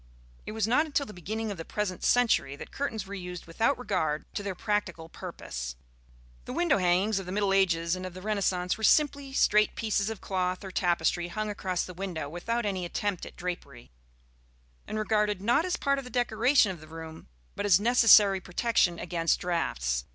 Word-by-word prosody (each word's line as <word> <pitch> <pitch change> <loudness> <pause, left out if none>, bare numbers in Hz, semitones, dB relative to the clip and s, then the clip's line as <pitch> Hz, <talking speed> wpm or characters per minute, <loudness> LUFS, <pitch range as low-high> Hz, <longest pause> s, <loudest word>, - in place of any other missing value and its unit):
It - - -4
was 220 -1 0
not 295 +7 +3
until 285 -1 0
the 210 - -10
beginning 215 +5 -4
of 200 - -6
the 165 - -5
present 185 -1 -3
century 230 - +3
that - - -10
curtains 225 -8 -3
were 195 - -9
used 180 -2 -6
without 225 +11 +1
regard 160 -10 -1
to - - -3
their 200 -2 -4
practical 175 -5 -2
purpose. 60 - -6 0.7
The - - -6
window 345 - +2
hangings 185 +3 +2
of 190 - -8
the - - -5
middle 200 0 +1
ages 170 -3 +2
and 185 - -7
of 185 -1 -7
the 185 - -8
Renaissance 195 -3 0
were - - -7
simply 285 +3 +3
straight 215 -5 +3
pieces 215 -2 0
of 220 -3 -5
cloth 185 -1 -2
or 190 - -7
tapestry 175 -1 +1
hung 215 +4 -3
across 185 -3 -2
the 180 - -9
window 175 -5 -4
without 220 +9 -2
any 190 -3 -1
attempt 190 +2 -3
at - - -12
drapery, 140 - -6 1.0
and 215 - -4
regarded 210 -2 +1
not 240 - +2
as 365 - -1
part 275 0 +1
of - - -7
the 250 - -9
decoration 245 -1 +3
of 175 -4 -9
the 155 - -12
room, 160 0 -9 0.3
but 205 - -2
as 185 -3 +7
a 205 - -6
necessary 215 -4 +6
protection 180 -2 +1
against 165 -1 0
draughts. 60 - -1
195 Hz, 195 wpm, -28 LUFS, 175-220 Hz, 1.0 s, as